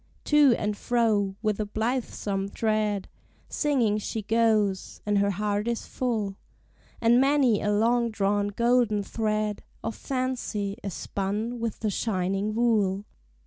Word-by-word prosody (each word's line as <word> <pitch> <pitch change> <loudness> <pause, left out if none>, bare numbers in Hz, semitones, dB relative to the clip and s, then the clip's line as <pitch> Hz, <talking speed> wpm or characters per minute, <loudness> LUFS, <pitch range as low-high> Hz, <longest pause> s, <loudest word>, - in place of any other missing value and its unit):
To 295 -5 +5
and 210 0 -1
fro, 210 -4 +1
with 215 -1 0
a 215 - 0
blithesome 215 -3 -2
tread, 215 -2 0 0.4
Singing 245 -9 +1
she 215 +1 -4
goes, 215 -3 +1
and 205 -1 +2
her 200 0 +2
heart 205 +2 -1
is 235 -1 -2
full, 215 -6 -2 0.6
And 235 +2 +5
many 270 -6 +3
a 210 - 0
long 235 +3 +2
drawn 205 -1 0
golden 235 -1 +2
thread 215 0 -1 0.2
Of 225 - -2
fancy 250 -6 -2
is 195 -4 -5
spun 210 +5 -3
with 230 -2 -3
the 215 -2 0
shining 195 0 -1
wool. 210 -4 +2
215 Hz, 135 wpm, -27 LUFS, 205-235 Hz, 0.6 s, To